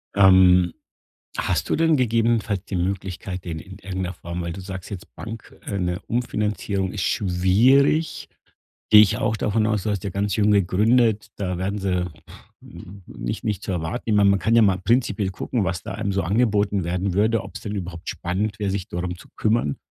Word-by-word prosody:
Ähm. 95 Hz, -2 st, +6 dB, 0.6 s
Hast -, -, -1 dB
du -, -, +2 dB
denn 160 Hz, -2 st, +3 dB
gegebenenfalls 115 Hz, -4 st, +1 dB
die 95 Hz, -, -4 dB
Möglichkeit, 95 Hz, 0 st, -3 dB
den 80 Hz, -2 st, -5 dB
in 95 Hz, +2 st, -11 dB
irgend 95 Hz, -1 st, -4 dB
'ner 90 Hz, 0 st, -4 dB
Form 85 Hz, 0 st, -6 dB
weil 85 Hz, -1 st, -4 dB
du 95 Hz, -, -8 dB
sagst 95 Hz, -1 st, -7 dB
jetzt 95 Hz, -3 st, -9 dB
Bank, 115 Hz, 0 st, -8 dB
äh, 100 Hz, -, -3 dB
'ne 90 Hz, 0 st, -1 dB
Umfinanzierung 105 Hz, -5 st, -1 dB
ist 100 Hz, -, -3 dB
schwierig. 115 Hz, -, +2 dB, 0.6 s
Geh 105 Hz, -, +9 dB
ich 100 Hz, -, +3 dB
ja -, -, -3 dB
auch 110 Hz, -, 0 dB
davon 110 Hz, +1 st, +1 dB
aus, 105 Hz, -3 st, 0 dB
du 105 Hz, -, -1 dB
hast 100 Hz, -2 st, -2 dB
ja 100 Hz, -, -3 dB
ganz 100 Hz, +1 st, -1 dB
jung 105 Hz, 0 st, +3 dB
gegründet, 105 Hz, +3 st, +3 dB
da 90 Hz, -3 st, -3 dB
werden 100 Hz, +2 st, -2 dB
sie, 90 Hz, -2 st, 0 dB, 0.2 s
puh, -, -, -16 dB, 0.7 s
nich -, -, -5 dB
nicht 105 Hz, -3 st, -2 dB
zu -, -, -5 dB
erwarten 85 Hz, +6 st, -3 dB
ich 110 Hz, -, +3 dB
mein, 100 Hz, -1 st, +5 dB
man 100 Hz, -, +3 dB
kann 110 Hz, +3 st, +1 dB
ja 115 Hz, -, +7 dB
mal 95 Hz, -3 st, +3 dB
prinzipiell 115 Hz, 0 st, +1 dB
gucken, 105 Hz, +4 st, -2 dB
was 90 Hz, -2 st, -2 dB
da -, -, -6 dB
einem 100 Hz, 0 st, -2 dB
so 95 Hz, 0 st, 0 dB
angeboten 100 Hz, -1 st, +1 dB
werden 90 Hz, +2 st, -1 dB
würde, 110 Hz, +2 st, +2 dB
ob -, -, -12 dB
's -, -, -16 dB
denn 105 Hz, -1 st, -5 dB
überhaupt 90 Hz, -3 st, -6 dB
spannend 100 Hz, +4 st, -2 dB
wäre, 100 Hz, -2 st, -1 dB
sich 100 Hz, 0 st, -3 dB
darum 90 Hz, -1 st, -4 dB
zu -, -, -15 dB
kümmern, 110 Hz, -10 st, +1 dB
100 Hz, 200 wpm, -23 LUFS, 90-110 Hz, 0.7 s, Geh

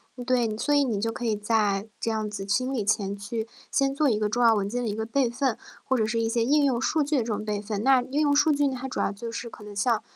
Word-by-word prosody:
嗯， 250 Hz, -, -7 dB
对， 240 Hz, -4 st, +1 dB
所 290 Hz, +5 st, 0 dB
以 285 Hz, -1 st, +4 dB
你 225 Hz, -6 st, -1 dB
就 225 Hz, 0 st, 0 dB
可 240 Hz, +1 st, -5 dB
以 220 Hz, -2 st, +1 dB
在 210 Hz, -1 st, 0 dB
这 230 Hz, -, -1 dB
样 215 Hz, -1 st, -2 dB
子 200 Hz, -2 st, -6 dB
清 255 Hz, +6 st, 0 dB
理 225 Hz, -5 st, -1 dB
前 200 Hz, -1 st, 0 dB
去 220 Hz, +3 st, -4 dB, 0.2 s
先 275 Hz, -1 st, +2 dB
做 295 Hz, +1 st, +2 dB
一 215 Hz, -2 st, +1 dB
个 210 Hz, -1 st, 0 dB
重 245 Hz, +2 st, +1 dB
要 230 Hz, -1 st, +6 dB
文 200 Hz, -1 st, -1 dB
件 245 Hz, +2 st, -2 dB
的 225 Hz, -, -1 dB
一 205 Hz, -, -3 dB
个 220 Hz, -, -2 dB
备 250 Hz, +1 st, +1 dB
份， 260 Hz, -2 st, 0 dB, 0.3 s
或 260 Hz, -, 0 dB
者 220 Hz, -, +2 dB
是 230 Hz, +1 st, -1 dB
一 225 Hz, -, 0 dB
些 230 Hz, -1 st, +1 dB
应 290 Hz, +2 st, +3 dB
用 255 Hz, -4 st, +2 dB
数 305 Hz, +3 st, +1 dB
据 290 Hz, 0 st, 0 dB
的 240 Hz, -, +1 dB
这 -, -, -8 dB
种 210 Hz, -1 st, -2 dB
备 210 Hz, -1 st, -2 dB
份。 205 Hz, 0 st, -4 dB
那 265 Hz, -2 st, +5 dB
应 280 Hz, +4 st, -1 dB
用 290 Hz, -1 st, +3 dB
数 310 Hz, +2 st, +4 dB
据 285 Hz, 0 st, +2 dB
呢， 260 Hz, -1 st, -2 dB
它 265 Hz, -, -4 dB
主 260 Hz, -, -5 dB
要 -, -, +1 dB
就 230 Hz, +3 st, -7 dB
是 235 Hz, 0 st, -5 dB
可 215 Hz, -, -11 dB
能 205 Hz, -1 st, -10 dB
像 225 Hz, +2 st, +1 dB
230 Hz, 335 characters per minute, -26 LUFS, 210-260 Hz, 0.3 s, 要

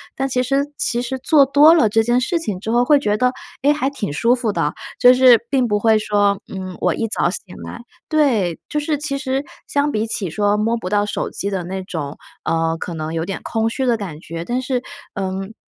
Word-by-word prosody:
但 270 Hz, 0 st, -1 dB
其 250 Hz, -1 st, +1 dB
实 275 Hz, +3 st, 0 dB
其 240 Hz, -, -1 dB
实 260 Hz, +2 st, -4 dB
做 280 Hz, +1 st, +5 dB
多 290 Hz, +4 st, +6 dB
了 275 Hz, -11 st, +4 dB
这 225 Hz, +2 st, +3 dB
件 240 Hz, +2 st, +2 dB
事 335 Hz, +7 st, 0 dB
情 205 Hz, -, -4 dB
之 220 Hz, -, -3 dB
后 240 Hz, +1 st, +3 dB
会 295 Hz, +3 st, +5 dB
觉 210 Hz, -6 st, 0 dB
得， 250 Hz, +1 st, +2 dB, 0.3 s
哎， 290 Hz, +2 st, +4 dB
还 275 Hz, -2 st, -1 dB
挺 215 Hz, -, -4 dB
舒 230 Hz, +11 st, +3 dB
服 235 Hz, -4 st, -2 dB
的， 165 Hz, -4 st, 0 dB, 0.3 s
就 250 Hz, 0 st, +8 dB
是 255 Hz, -2 st, +7 dB
并 260 Hz, -3 st, +2 dB
不 210 Hz, -1 st, +1 dB
会 220 Hz, 0 st, +4 dB
说， 205 Hz, -1 st, +1 dB
嗯， 185 Hz, -2 st, -7 dB
我 -, -, +1 dB
一 225 Hz, -, -2 dB
早 190 Hz, -, +1 dB
醒 185 Hz, 0 st, -8 dB
来 235 Hz, -, -8 dB, 0.3 s
对， 235 Hz, -, +2 dB
就 300 Hz, -, -1 dB
是 295 Hz, 0 st, -1 dB
其 285 Hz, -1 st, -3 dB
实 265 Hz, 0 st, -2 dB, 0.2 s
相 285 Hz, +1 st, +1 dB
比 220 Hz, -1 st, -1 dB
起 205 Hz, -4 st, -3 dB
说 205 Hz, +4 st, +1 dB
摸 225 Hz, +3 st, 0 dB
不 185 Hz, -, -6 dB
到 205 Hz, +1 st, +1 dB
手 210 Hz, -, -3 dB
机 200 Hz, -, -4 dB
的 190 Hz, -3 st, -3 dB
那 190 Hz, +1 st, -5 dB
种， 155 Hz, -7 st, -5 dB, 0.3 s
呃， 165 Hz, 0 st, 0 dB
可 175 Hz, -, -5 dB
能 155 Hz, 0 st, -4 dB
有 165 Hz, 0 st, -2 dB
点 195 Hz, +1 st, -5 dB
空 225 Hz, 0 st, 0 dB
虚 260 Hz, +3 st, -2 dB
的 240 Hz, -2 st, +2 dB
感 175 Hz, -7 st, -7 dB
觉。 165 Hz, +1 st, -6 dB
但 245 Hz, +4 st, -1 dB
是， 255 Hz, -1 st, -1 dB, 0.3 s
嗯， 195 Hz, +1 st, -4 dB
225 Hz, 250 characters per minute, -20 LUFS, 190-260 Hz, 0.3 s, 就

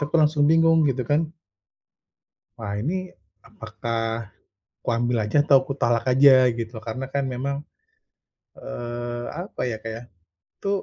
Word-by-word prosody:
aku 145 Hz, +2 st, -4 dB
langsung 150 Hz, -2 st, +3 dB
bingung 165 Hz, 0 st, +5 dB
gitu 125 Hz, -2 st, -1 dB
kan. 155 Hz, +4 st, 0 dB, 1.3 s
Wah, 100 Hz, -2 st, -4 dB
ini 185 Hz, +6 st, -3 dB, 0.3 s
apakah 115 Hz, -2 st, -4 dB, 0.5 s
aku -, -, -2 dB
ambil 120 Hz, 0 st, +1 dB
aja 105 Hz, +7 st, 0 dB
atau 145 Hz, -, +5 dB
aku 135 Hz, -, -4 dB
tolak 120 Hz, -1 st, +2 dB
aja 130 Hz, -1 st, +7 dB
gitu. 115 Hz, +1 st, -5 dB
Karena 115 Hz, +4 st, -4 dB
kan 140 Hz, -1 st, +1 dB
memang, 135 Hz, +3 st, -2 dB, 1.0 s
eee, 120 Hz, 0 st, -5 dB, 0.2 s
apa 195 Hz, -, -9 dB
ya 110 Hz, -, -3 dB
Kak, 115 Hz, -, -5 dB
ya, 115 Hz, -, -8 dB, 0.6 s
itu 200 Hz, -, -4 dB
130 Hz, 140 wpm, -24 LUFS, 115-150 Hz, 1.3 s, aja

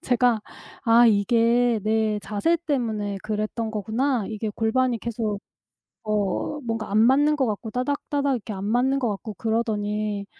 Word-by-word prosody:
제가 245 Hz, -3 st, +2 dB, 0.4 s
'아 235 Hz, +1 st, +6 dB
이게 230 Hz, +2 st, +3 dB
내 215 Hz, 0 st, +1 dB
자세 270 Hz, +12 st, +1 dB
때문에 215 Hz, -8 st, -1 dB
그랬던 215 Hz, +1 st, -2 dB
거구나.' 220 Hz, +3 st, -1 dB
이게 220 Hz, 0 st, -3 dB
골반이 235 Hz, +3 st, +1 dB
계속 220 Hz, -3 st, -3 dB, 0.7 s
어 215 Hz, +7 st, -1 dB
뭔가 225 Hz, -2 st, -3 dB
안 215 Hz, -, +3 dB
맞는 285 Hz, +6 st, +4 dB
것 270 Hz, -, +1 dB
같고 220 Hz, 0 st, -3 dB
따닥따닥 285 Hz, +2 st, -1 dB
이렇게 215 Hz, -2 st, -6 dB
안 190 Hz, -, -6 dB
맞는 255 Hz, +5 st, +2 dB
것 240 Hz, -4 st, 0 dB
같고 210 Hz, +2 st, -5 dB
그러더니 210 Hz, -2 st, -1 dB
225 Hz, 290 characters per minute, -24 LUFS, 210-245 Hz, 0.7 s, 아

